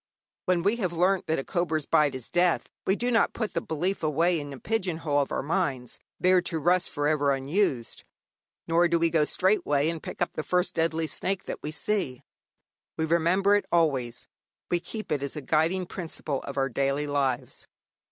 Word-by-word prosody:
When 180 -2 +2
we 205 +5 +2
have 185 -7 -1
learnt 185 +3 +2
that 160 - +1
a 135 - -2
cobra's 160 -3 -1
bite 145 -3 +3
is 130 -3 -5
death, 175 -1 +2 0.2
we 190 - +4
do 245 +3 -1
not 230 - +3
put 220 -3 -3
the - - 0
belief 180 +5 -2
away 165 +3 +2
in 145 -1 -7
a 135 - -8
pigeon 195 -6 -1
hole 150 -3 0
of 140 - -3
our - - -1
minds, 140 -6 -2 0.2
there 185 0 +4
to 165 - -2
rust 175 +3 +2
for 145 0 -1
ever 145 -2 +2
unused, 135 - -1 0.6
nor 170 +1 +4
do 170 0 +2
we 165 0 +2
go 155 -2 +3
straightway 155 -6 +2
and 165 -2 -6
pick - - -8
up - - 0
the - - -3
first 180 +3 0
deadly 165 0 0
snake 190 +4 -2
that - - -5
we 150 - -4
see. 155 -5 -2 0.7
We 160 - +1
remember 170 +5 +3
it 205 - 0
always; 135 -8 +1 0.4
we 175 - +2
keep 200 +1 -7
it 145 -2 0
as 140 +2 -4
a 150 - -4
guiding 165 +6 +1
principle 160 -6 -4
of 140 0 -7
our 135 0 +2
daily 140 +3 0
lives. 140 -2 -2
165 Hz, 200 wpm, -27 LUFS, 145-180 Hz, 0.7 s, we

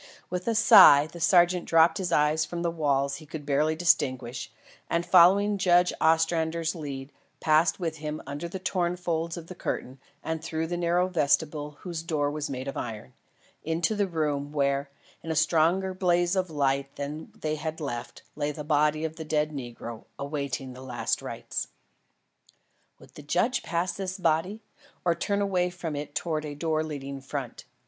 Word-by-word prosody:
With 180 +2 -3
a 230 - +1
sigh, 145 -9 +8
the 170 +2 -11
sergeant 175 +1 +4
dropped 165 +4 +4
his 180 -2 -2
eyes 150 0 +3
from 170 +2 -4
the 170 - 0
walls 140 -4 0
he 155 - -13
could 150 0 -7
barely 150 +2 +1
distinguish, 130 -8 0 0.4
and 170 +1 0
following 195 +4 +5
Judge 180 -1 +4
Ostrander's 165 0 +2
lead, 140 -4 -6 0.3
passed 160 +3 +3
with 165 -3 -3
him 150 0 -4
under 145 +5 -5
the 190 - -5
torn 180 -2 -1
folds 170 -1 -2
of 170 - -7
the 185 - -9
curtain 130 -6 -4 0.2
and 160 0 -3
through 160 0 -2
the 175 +2 -3
narrow 175 +1 +1
vestibule 150 -3 0
whose 170 -3 -5
door 155 -4 -1
was 150 0 -4
made 130 0 -5
of 135 - -4
iron, 105 - -6 0.5
into 165 +5 0
the 205 -2 0
room, 150 -4 -2
where, 140 -1 0 0.3
in 165 - -8
a 160 - -1
stronger 170 +4 +2
blaze 175 -1 +2
of 185 -2 0
light 140 -2 0
than 145 +2 -6
they 155 -1 -2
had 155 +1 -4
left, 120 -6 -6
lay 150 0 -1
the 150 +1 -7
body 150 +1 +2
of 160 +1 -5
the 160 - -5
dead 150 0 0
negro 120 -4 -7
awaiting 140 -2 -4
the 125 - -11
last 125 -2 -2
rites. - - -5 1.3
Would - - -18
the - - -10
judge 190 - +1
pass 170 +1 -1
this 190 0 -4
body, 185 +5 0 0.4
or 170 - +4
turn 200 +4 -1
away 185 -3 +1
from 175 -3 -5
it 145 0 -6
towards 155 -3 -2
a 145 - -6
door 155 +1 0
leading 140 -3 -6
front? 135 -2 -6
160 Hz, 175 wpm, -27 LUFS, 145-175 Hz, 1.3 s, sigh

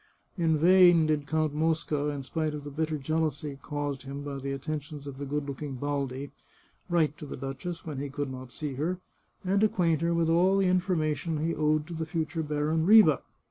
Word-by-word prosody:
In 165 -4 +2
vain 175 0 +6
did 150 -2 0
Count 155 -2 0
Mosca, 155 -1 0
in 145 -2 -3
spite 155 +2 -2
of 145 - -6
the 145 - -7
bitter 155 +1 -1
jealousy 150 -1 -2
caused 145 -2 -3
him 140 +1 -7
by 140 -1 -5
the 135 +1 -4
attentions 145 +1 -5
of 140 -1 -8
the 140 - -4
good 145 +1 -2
looking 140 0 -5
Baldi, 140 0 -3 0.6
write 160 -4 +1
to 150 - -7
the - - -6
duchess 135 +6 -6
when 150 -4 -5
he 140 0 -4
could 145 -1 -3
not 130 -1 -8
see 150 0 -5
her, 160 +7 -1 0.5
and 195 +2 +2
acquaint 175 -8 +2
her 170 0 +1
with 165 -1 +2
all 180 +4 +4
the 195 - +3
information 170 -4 0
he 165 - 0
owed 155 0 +1
to 175 - -8
the 160 -1 -3
future 160 0 -2
Baron 150 +1 0
Riva. 195 -6 +7
155 Hz, 200 wpm, -28 LUFS, 140-165 Hz, 0.6 s, Riva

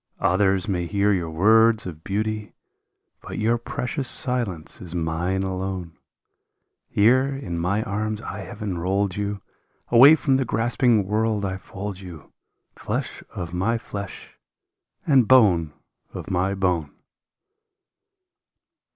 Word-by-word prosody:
Others 95 +1 +2
may 90 -4 -1
hear 100 +2 +2
your 85 -4 -2
words 110 +7 +4
of 80 -3 -8
beauty, 105 +1 -3 0.7
But - - -8
your 115 +2 +1
precious 125 +3 -3
silence 115 - 0
is 90 -1 -7
mine 85 +3 -1
alone; 95 -3 -4 0.9
Here 125 +6 +4
in 135 -11 -4
my 100 +6 0
arms 110 -1 -3
I 105 -2 -7
have 100 +2 -8
enrolled 95 0 -1
you. 100 -1 -3 0.5
Away 130 +6 +8
from 135 -4 +1
the 135 - +1
grasping 120 -2 +1
world 105 0 0
I 95 -1 -3
fold 100 -1 -7
you. 90 -5 -12 0.4
Flesh - - -4
of 85 -2 -5
my 100 +7 0
flesh 100 -4 -8 0.7
and 135 -7 +4
bone 95 - +5 0.4
of - - -6
my 95 +2 0
bone 90 -6 0
100 Hz, 125 wpm, -23 LUFS, 90-110 Hz, 0.9 s, Away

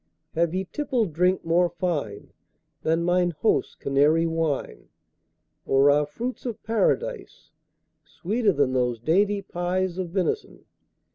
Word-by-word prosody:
Have 170 +1 0
ye 190 +1 -1
tippled 245 - -1
drink 180 +3 +1
more 175 +2 +3
fine 165 - -4 0.5
Than 165 +1 +1
mine 175 -1 +1
host's 225 - +1
Canary 150 +4 +2
wine? 165 -3 -2 0.7
Or 135 +1 +4
are 145 0 +2
fruits 245 +11 -5
of 225 -2 -6
Paradise 230 - -1 0.5
Sweeter 210 +3 0
than 140 -6 +1
those 125 -2 0
dainty 200 - +1
pies 180 +1 -2
Of 180 -2 -3
venison? 195 - -2
175 Hz, 125 wpm, -25 LUFS, 155-200 Hz, 0.7 s, Or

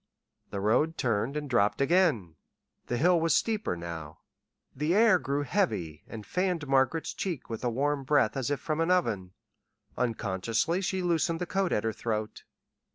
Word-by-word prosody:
The 100 - -4
road 120 +11 +2
turned 120 +4 0
and 150 -1 -4
dropped 110 -6 +2
again. 140 - +2 0.5
The 120 - -1
hill 175 +4 +4
was 165 0 +3
steeper 215 - 0
now. 80 -3 -7 0.6
The 150 +6 0
air 215 -4 +5
grew 140 0 -1
heavy 125 - -1
and 110 -2 -8
fanned 180 -5 -1
Margaret's 135 +4 +1
cheek 170 -11 -4
with 115 - -5
a 125 - +1
warm 140 +4 0
breath 135 -5 +2
as 135 -1 -2
if 145 - -1
from 155 0 -2
an 165 - +1
oven. 110 - 0 0.6
Unconsciously 115 - -1
she 190 0 -1
loosened 165 -1 +1
the 180 - -2
coat 190 +1 -1
at 105 - +1
her 110 0 -1
throat. 110 -1 -4
140 Hz, 165 wpm, -29 LUFS, 110-170 Hz, 0.6 s, air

